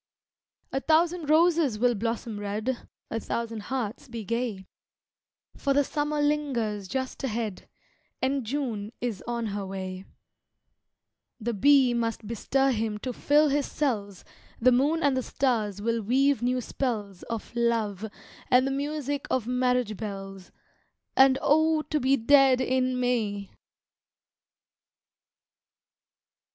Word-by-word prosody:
A 270 Hz, -, 0 dB
thousand 325 Hz, +1 st, +2 dB
roses 320 Hz, -6 st, +4 dB
will 245 Hz, +2 st, +3 dB
blossom 230 Hz, 0 st, -3 dB
red, 215 Hz, +5 st, -3 dB, 0.2 s
A 225 Hz, -, -1 dB
thousand 230 Hz, -1 st, -3 dB
hearts 250 Hz, +3 st, -4 dB
be 230 Hz, -3 st, -6 dB
gay, 230 Hz, -3 st, -2 dB, 0.9 s
For 275 Hz, -1 st, 0 dB
the 285 Hz, -, +5 dB
summer 295 Hz, +1 st, -2 dB
lingers 245 Hz, -9 st, -1 dB
just 260 Hz, +6 st, -4 dB
ahead 225 Hz, -5 st, -3 dB, 0.5 s
And 265 Hz, 0 st, 0 dB
June 230 Hz, -4 st, -3 dB
is 235 Hz, -6 st, -3 dB
on 235 Hz, -1 st, -2 dB
her 205 Hz, -1 st, -3 dB
way; 190 Hz, -1 st, -6 dB, 1.3 s
The 235 Hz, +1 st, -2 dB
bee 265 Hz, +2 st, +5 dB
must 230 Hz, -2 st, -2 dB
bestir 265 Hz, +5 st, +1 dB
him 220 Hz, -3 st, -1 dB
to 250 Hz, +4 st, -4 dB
fill 295 Hz, +4 st, +3 dB
his 285 Hz, +1 st, 0 dB
cells, 205 Hz, -10 st, -2 dB, 0.3 s
The 255 Hz, +2 st, +5 dB
moon 290 Hz, +7 st, +2 dB
and 285 Hz, -2 st, +3 dB
the 260 Hz, -, +1 dB
stars 215 Hz, -7 st, -1 dB
will 230 Hz, 0 st, 0 dB
weave 265 Hz, +4 st, +2 dB
new 250 Hz, +1 st, +1 dB
spells 210 Hz, -7 st, -3 dB
Of 230 Hz, +1 st, -5 dB
love 220 Hz, -4 st, 0 dB, 0.4 s
and 250 Hz, +1 st, +5 dB
the 270 Hz, -, -1 dB
music 285 Hz, 0 st, -3 dB
of 255 Hz, -4 st, 0 dB
marriage 250 Hz, -3 st, 0 dB
bells 195 Hz, -3 st, -7 dB, 0.6 s
And, 265 Hz, 0 st, +6 dB
oh, 315 Hz, +1 st, +3 dB
to 305 Hz, -, -1 dB
be 270 Hz, +1 st, +3 dB
dead 270 Hz, +1 st, +5 dB
in 255 Hz, 0 st, +1 dB
May! 215 Hz, -5 st, -1 dB
245 Hz, 125 wpm, -27 LUFS, 215-275 Hz, 1.3 s, And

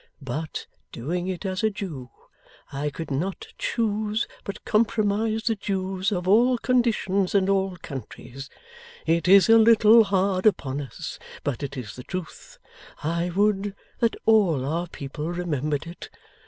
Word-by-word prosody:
But 150 Hz, +5 st, -4 dB, 0.3 s
doing 175 Hz, +9 st, -3 dB
it 185 Hz, +1 st, -4 dB
as 185 Hz, -1 st, -2 dB
a 220 Hz, -, +4 dB
Jew, 165 Hz, -12 st, -6 dB, 0.6 s
I 140 Hz, +2 st, -2 dB
could 145 Hz, +1 st, -7 dB
not 175 Hz, +8 st, -3 dB
choose 215 Hz, -1 st, -1 dB, 0.2 s
but 200 Hz, -, -7 dB
compromise 220 Hz, 0 st, +1 dB
the 225 Hz, -, +2 dB
Jews 190 Hz, -1 st, -2 dB
of 180 Hz, -2 st, -2 dB
all 240 Hz, +6 st, +5 dB
conditions 220 Hz, -7 st, +1 dB
and 190 Hz, -1 st, +3 dB
all 195 Hz, -2 st, +1 dB
countries. 135 Hz, -1 st, -8 dB, 0.6 s
It 165 Hz, +2 st, +1 dB
is 195 Hz, +1 st, +7 dB
a 225 Hz, 0 st, +7 dB
little 225 Hz, 0 st, +7 dB
hard 195 Hz, 0 st, +2 dB
upon 140 Hz, -8 st, 0 dB
us, 135 Hz, -5 st, -7 dB, 0.2 s
but 140 Hz, -5 st, -2 dB
it 140 Hz, -1 st, -5 dB
is 115 Hz, -4 st, -6 dB
the 125 Hz, -, -9 dB
truth. 185 Hz, +1 st, -7 dB, 0.5 s
I 170 Hz, +3 st, 0 dB
would 200 Hz, +1 st, +1 dB, 0.2 s
that 230 Hz, -1 st, +2 dB
all 190 Hz, -12 st, +4 dB
our 165 Hz, +5 st, -1 dB
people 150 Hz, +1 st, -6 dB
remembered 155 Hz, -4 st, -2 dB
it! 170 Hz, +1 st, -9 dB
185 Hz, 145 wpm, -25 LUFS, 155-210 Hz, 0.6 s, is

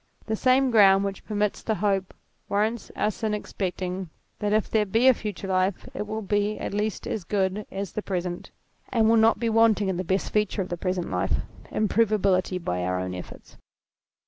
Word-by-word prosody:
The 220 Hz, -, -1 dB
same 255 Hz, +2 st, +3 dB
ground 195 Hz, -3 st, +6 dB
which 195 Hz, -1 st, -4 dB
permits 210 Hz, -1 st, -1 dB
the 220 Hz, -, -1 dB
hope 195 Hz, -2 st, 0 dB, 0.3 s
warrants 215 Hz, +3 st, -1 dB
us 210 Hz, -1 st, -1 dB
in 215 Hz, -1 st, 0 dB
expecting 185 Hz, -3 st, -4 dB, 0.3 s
that 205 Hz, 0 st, -1 dB
if 215 Hz, 0 st, +2 dB
there 220 Hz, -1 st, +2 dB
be 225 Hz, +6 st, +3 dB
a 260 Hz, -, +8 dB
future 210 Hz, -4 st, -5 dB
life 185 Hz, 0 st, 0 dB
it 210 Hz, -, -4 dB
will 215 Hz, +1 st, -4 dB
be 205 Hz, +1 st, 0 dB
at -, -, -4 dB
least 210 Hz, 0 st, -2 dB
as 210 Hz, -, -3 dB
good 195 Hz, +2 st, -1 dB
as 195 Hz, 0 st, -5 dB
the 215 Hz, -, -3 dB
present, 180 Hz, -3 st, -4 dB, 0.4 s
and 225 Hz, -3 st, +3 dB
will 225 Hz, -, +5 dB
not 225 Hz, 0 st, +5 dB
be 235 Hz, -, 0 dB
wanting 220 Hz, -3 st, +3 dB
in 185 Hz, -, -1 dB
the 185 Hz, -, -2 dB
best 190 Hz, +2 st, -1 dB
feature 210 Hz, -1 st, +1 dB
of 185 Hz, -, -10 dB
the 175 Hz, -, -2 dB
present 180 Hz, 0 st, -2 dB
life, -, -, 0 dB, 0.4 s
im 215 Hz, -, +1 dB
provability 200 Hz, -4 st, +2 dB
by 90 Hz, -, -2 dB
our 90 Hz, 0 st, -1 dB
own 90 Hz, 0 st, -3 dB
efforts. 90 Hz, -, -10 dB
205 Hz, 200 wpm, -26 LUFS, 185-215 Hz, 0.4 s, a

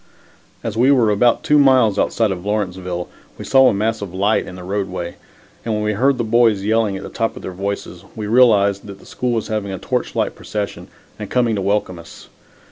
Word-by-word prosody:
As 110 Hz, -2 st, -4 dB
we 125 Hz, +4 st, +3 dB
were 120 Hz, -6 st, +4 dB
about 115 Hz, +3 st, +2 dB
two 150 Hz, 0 st, +4 dB
miles 130 Hz, -7 st, +4 dB
outside 110 Hz, -3 st, +1 dB
of 90 Hz, -2 st, -5 dB
Lawrenceville, 90 Hz, -4 st, -3 dB, 0.3 s
we -, -, -8 dB
saw 135 Hz, -1 st, +5 dB
a -, -, 0 dB
mass 110 Hz, +2 st, -1 dB
of 95 Hz, -3 st, -7 dB
light 100 Hz, +3 st, +1 dB
in 90 Hz, -, -8 dB
the 90 Hz, -, -9 dB
roadway, 95 Hz, -2 st, -3 dB, 0.5 s
and 110 Hz, -2 st, -2 dB
when 105 Hz, -, -2 dB
we 105 Hz, 0 st, 0 dB
heard 130 Hz, +6 st, +2 dB
the 120 Hz, -, -1 dB
boys 115 Hz, -3 st, +3 dB
yelling 110 Hz, -2 st, +1 dB
at -, -, -8 dB
the -, -, -7 dB
top 115 Hz, 0 st, -2 dB
of -, -, -10 dB
their -, -, -5 dB
voices, 95 Hz, -2 st, -5 dB
we 110 Hz, -, -5 dB
realized 105 Hz, -4 st, +3 dB
that 100 Hz, -1 st, -9 dB
the -, -, -17 dB
school 125 Hz, -, -3 dB
was 115 Hz, -2 st, -2 dB
having 105 Hz, -2 st, -2 dB
a 95 Hz, -, -4 dB
torch -, -, -3 dB
light -, -, 0 dB
procession 105 Hz, -2 st, -5 dB, 0.3 s
and -, -, -6 dB
coming 120 Hz, -3 st, +1 dB
to 100 Hz, -, -2 dB
welcome 95 Hz, -2 st, -1 dB
us. 85 Hz, -, -14 dB
105 Hz, 220 wpm, -19 LUFS, 95-115 Hz, 0.5 s, saw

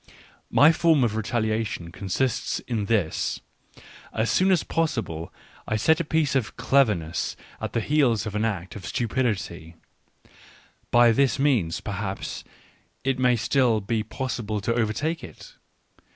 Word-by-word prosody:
My 145 Hz, +3 st, +6 dB
form 160 Hz, -4 st, +3 dB
of 110 Hz, -3 st, 0 dB
retaliation 110 Hz, -5 st, -2 dB
consists 100 Hz, +7 st, -1 dB
in 110 Hz, -4 st, -2 dB
this: 100 Hz, -7 st, 0 dB, 0.7 s
as 110 Hz, +1 st, 0 dB
soon 185 Hz, +1 st, +3 dB
as 185 Hz, -4 st, +3 dB
possible 115 Hz, -, -2 dB, 0.4 s
to 110 Hz, -, +1 dB
set 160 Hz, +9 st, +3 dB
a -, -, +1 dB
piece 155 Hz, -2 st, +1 dB
of 125 Hz, -5 st, -1 dB
cleverness 110 Hz, -, +1 dB, 0.3 s
at -, -, -4 dB
the 115 Hz, -, +1 dB
heels 125 Hz, -7 st, +2 dB
of 105 Hz, -, -4 dB
an 105 Hz, +1 st, -1 dB
act 95 Hz, -5 st, -3 dB
of 100 Hz, -, -7 dB
stupidity; 105 Hz, -9 st, -2 dB, 1.1 s
by 120 Hz, -1 st, +6 dB
this 135 Hz, +3 st, +2 dB
means 125 Hz, -, +1 dB
perhaps 100 Hz, -1 st, -4 dB, 0.6 s
it 135 Hz, 0 st, 0 dB
may 125 Hz, -1 st, +4 dB
still 120 Hz, 0 st, +2 dB
be 110 Hz, +2 st, -1 dB
possible 110 Hz, -2 st, -3 dB
to 115 Hz, -, 0 dB
overtake 120 Hz, +9 st, -1 dB
it. -, -, -11 dB
115 Hz, 135 wpm, -25 LUFS, 105-135 Hz, 1.1 s, My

